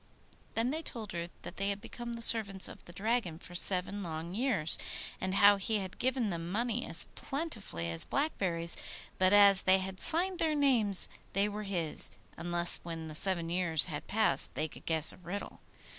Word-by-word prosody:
Then 230 +3 0
they 315 +2 -3
told 225 - -8
her 170 0 -5
that - - -9
they 195 +1 -1
had 200 0 -3
become 235 +2 -8
the 230 0 -2
servants 200 -5 +3
of - - -12
the - - -12
Dragon 200 -3 -2
for 175 - -14
seven 185 +3 +3
long 165 -1 -6
years, 210 - 0 0.4
and 185 +1 -2
how 205 0 +6
he 215 +3 0
had 190 -2 -7
given 255 -4 -1
them 170 0 -5
money 235 +3 -2
as - - 0
plentifully 235 - -4
as 80 - -1
blackberries; 180 - -1 0.4
but 185 0 +4
as 200 -2 +7
they 185 0 +4
had 190 0 -6
signed 360 +3 +2
their 315 -2 0
names 240 -9 +3 0.3
they 200 +2 +2
were 210 +1 -6
his, 170 -5 +5 0.3
unless 175 0 0
when 165 -2 -7
the - - -8
seven 170 +1 +2
years 170 -3 +2
had 150 -4 -7
passed 220 +1 +2
they 155 - -2
could - - -15
guess 160 -1 +3
a - - -16
riddle. 180 +3 -8
195 Hz, 190 wpm, -31 LUFS, 170-225 Hz, 0.4 s, as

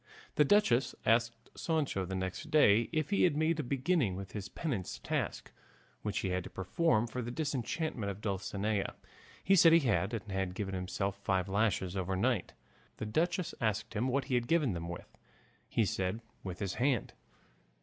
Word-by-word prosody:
The 150 - +5
duchess 135 - +3
asked 115 +1 +1
Sancho 150 - -1
the 95 +1 -4
next 95 0 -4
day 115 -7 +5
if 155 +1 -1
he 200 - +3
had 150 -5 +4
made 160 +1 +2
a - - 0
beginning 135 - +1
with 95 0 -7
his 100 -2 -5
penance 130 - -3
task - - -3 0.5
which 105 -1 -2
he 95 - -1
had 90 0 -1
to - - -8
perform 110 - +1
for 125 +2 -4
the 120 - -4
disenchantment 140 -4 -2
of 100 0 -5
Dulcinea. 100 0 -2 0.5
He 195 - +5
said 165 -2 +7
he 165 - +7
had, 105 - +1
and 105 -2 -6
had 95 -1 -2
given 95 -2 -3
himself 95 +1 -2
five 95 -2 0
lashes 95 -2 0
overnight. 95 +4 0 0.4
The - - -4
duchess 170 - 0
asked 110 0 -1
him 115 +4 0
what 135 +2 +1
he 130 - -4
had 120 -1 +1
given 150 - +2
them 85 0 -5
with. 85 - -8 0.5
He 115 - +2
said 95 +3 -1 0.2
with 90 -2 -5
his 100 -2 -2
hand. 130 -4 +1
110 Hz, 180 wpm, -33 LUFS, 95-140 Hz, 0.5 s, said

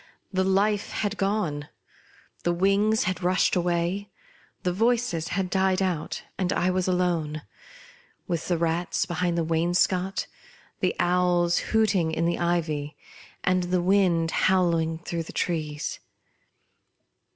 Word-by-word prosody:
The 190 0 +2
Life 200 +2 +1
had 205 -1 -1
gone; 185 -8 -1 0.7
the 175 - +1
wings 200 +4 +3
had 185 -1 -2
rushed 185 +2 +2
away; 175 +3 0 0.5
the 180 - 0
voices 225 -5 +1
had 190 -2 -2
died 190 0 +2
out, 180 -5 -2 0.2
and 185 -1 0
I 185 +1 +1
was 185 0 0
alone; 170 -5 0 0.8
with 170 -2 -2
the 175 - +1
rats 170 +2 0
behind 175 -1 -1
the 170 - +1
wainscot, 175 +3 +1 0.5
the - - 0
owls 175 -1 +2
hooting 205 -7 +1
in 160 +1 0
the 170 - 0
ivy, 155 -4 -1 0.5
and 185 -1 +2
the 180 +1 +1
wind 175 -3 +2
howling 170 -4 +2
through 170 0 -4
the 165 - -8
trees. 155 -3 -2
180 Hz, 130 wpm, -26 LUFS, 165-190 Hz, 0.8 s, wings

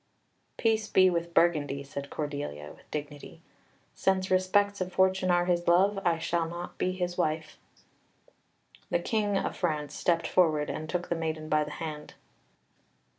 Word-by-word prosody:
"Peace 220 -1 +1
be 185 -1 +5
with 170 0 -2
Burgundy!" 145 -5 +2
said 140 0 -7
Cordelia 145 - -5
with - - -23
dignity. 145 -1 -7 0.5
"Since 190 -1 0
respects 200 +2 +2
of 185 0 -2
fortune 190 0 +2
are 175 0 +3
his 175 -1 0
love, 195 +4 +4
I 170 -1 +2
shall 165 0 -1
not 175 +1 -7
be 185 - +1
his 180 -1 -3
wife." 155 -2 -1 1.3
The - - +2
King 205 +2 0
of - - -2
France 150 -4 -2
stepped 170 0 +1
forward 155 -5 +2
and 155 0 -6
took 175 +1 -2
the 170 - +1
maiden 160 -1 -3
by 155 0 +3
the 150 - -7
hand. 155 -2 -6
170 Hz, 155 wpm, -29 LUFS, 155-185 Hz, 1.3 s, be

